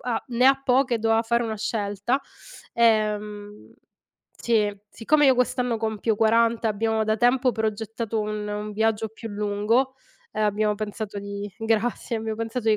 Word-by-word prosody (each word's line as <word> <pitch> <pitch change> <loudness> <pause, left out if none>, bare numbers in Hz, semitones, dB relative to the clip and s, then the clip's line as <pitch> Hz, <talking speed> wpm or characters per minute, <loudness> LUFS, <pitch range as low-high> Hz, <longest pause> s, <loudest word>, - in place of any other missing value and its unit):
Ha 245 -2 -2
ne 250 +2 +3
ha 270 0 +5
poche 260 -1 +2
e - - 0
doveva 225 0 +2
fare 235 +1 +1
una 220 -1 -3
scelta. 210 +4 -1 0.5
Ehm 210 -2 0 0.7
sì, 210 -3 +1
siccome 295 +6 +2
io 260 -2 +5
quest'anno 250 -1 +1
compio 220 0 -1
40, 230 +1 +3
e 220 - +2
abbiamo 220 +1 0
da 215 0 +1
tempo 245 +2 +3
progettato 220 0 -3
un 210 0 -3
un 210 0 -4
viaggio 220 +1 0
più 225 +1 -9
lungo, 210 +5 0 0.4
ehm, 215 - -1
abbiamo 210 0 +1
pensato 205 -1 -5
di 200 0 -6
grazie, 225 +1 -1
abbiamo 220 0 -3
pensato 230 +1 -3
di 215 - +4
220 Hz, 160 wpm, -24 LUFS, 210-235 Hz, 0.7 s, ha